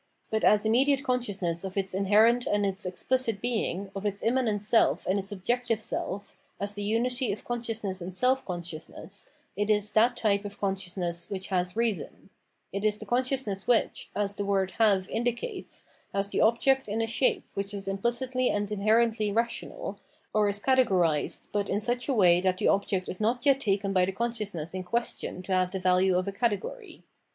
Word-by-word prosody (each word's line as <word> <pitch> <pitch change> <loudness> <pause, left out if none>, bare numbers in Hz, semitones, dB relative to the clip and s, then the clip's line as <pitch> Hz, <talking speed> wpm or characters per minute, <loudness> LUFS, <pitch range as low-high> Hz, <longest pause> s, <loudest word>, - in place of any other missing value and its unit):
But 220 0 0
as 210 0 +5
immediate 270 +5 +3
consciousness 200 -10 -1
of 190 0 -6
its 190 -1 -1
inherent 215 +5 +4
and 205 0 +2
its 195 0 -2
exphcit 225 +3 -1
being, 200 -5 -2
of 195 - -4
its 205 -1 -2
immanent 230 -4 +1
self 225 +2 +3
and 195 +2 +1
its 195 +1 -5
objective 230 +3 -1
self, 200 -2 -4 0.2
as 200 +1 -2
the 205 - -5
unity 240 +4 0
of 205 - -6
consciousness 225 -5 -3
and 180 +1 -6
self 255 +5 +2
consciousness, 175 +2 -7 0.3
it 205 +2 -1
is 210 -1 +2
that 235 +3 +3
type 200 -2 +1
of 205 0 -8
consciousness 180 -3 -2
which 190 -1 -5
has 180 -1 0
Eeason: 225 -7 -2 0.4
it 200 +1 -3
is 210 -1 +2
the - - -7
consciousness 250 -5 -1
which, 245 -2 +1
as 205 -1 -1
the 205 - -1
word 195 -1 +1
" - - -18
have 200 -4 +4
indicates, 245 - -3 0.3
has 195 0 0
the - - 0
object 265 +4 +3
in 210 +2 -2
a 225 - +2
shape 240 +3 +1
which 200 +1 -3
is 200 -1 -5
imphcitly 240 +6 0
and 205 0 -1
inherently 215 +1 +2
rational, 230 +3 -2 0.3
or 210 -1 +3
is 200 0 -1
cate 260 +4 +3
gorised, 170 -6 0
but 205 -1 -1
in 205 - +1
such 240 +3 -1
a - - +3
way 180 -4 +5
that 185 0 +1
the - - +1
object 195 -2 +1
is 185 - -5
not 240 +4 0
yet 275 -1 +5
taken 195 -4 0
by 185 -1 +4
the 190 - -2
consciousness 205 -7 -3
m 185 - -3
question 185 -2 -3
to 190 - -2
have 185 -1 +2
the 190 - -4
value 185 0 +3
of 185 +1 -1
a - - -1
category. 235 - -3
205 Hz, 190 wpm, -28 LUFS, 190-235 Hz, 0.4 s, as